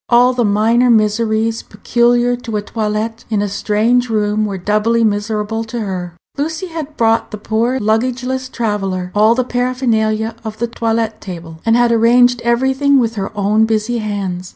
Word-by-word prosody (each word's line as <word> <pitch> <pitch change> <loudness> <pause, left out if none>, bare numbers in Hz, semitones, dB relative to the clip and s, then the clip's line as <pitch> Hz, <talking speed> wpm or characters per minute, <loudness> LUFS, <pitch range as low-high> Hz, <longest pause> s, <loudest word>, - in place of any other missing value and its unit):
All 245 +1 +5
the 245 -1 0
minor 225 +4 +2
miseries 220 0 +1
peculiar 240 +3 +1
to 235 -3 -5
a - - -1
toilet 220 +1 -3
in 215 -2 0
a 205 - 0
strange 220 +5 +1
room 215 -1 0
were 195 -2 -4
doubly 215 +5 +1
miserable 210 +1 -1
to 235 +2 -5
her. 180 -4 -5 0.2
Lucy 320 +5 -3
had 310 -2 -7
brought 225 -1 +2
the 215 - -6
poor 230 +5 -1
luggageless 255 +4 -1
traveller 195 -6 -2
all 215 +2 +4
the 255 - +1
paraphernalia 230 -3 -1
of 220 -1 -6
the 235 - -1
toilet 225 -1 -2
table, 165 -4 -8
and 225 - +4
had 240 -1 +3
arranged 240 +1 +4
everything 265 +4 +2
with 230 -3 +1
her 195 -3 -4
own 210 +2 +2
busy 220 +2 -1
hands. 195 -4 -4
225 Hz, 165 wpm, -16 LUFS, 210-240 Hz, 0.2 s, All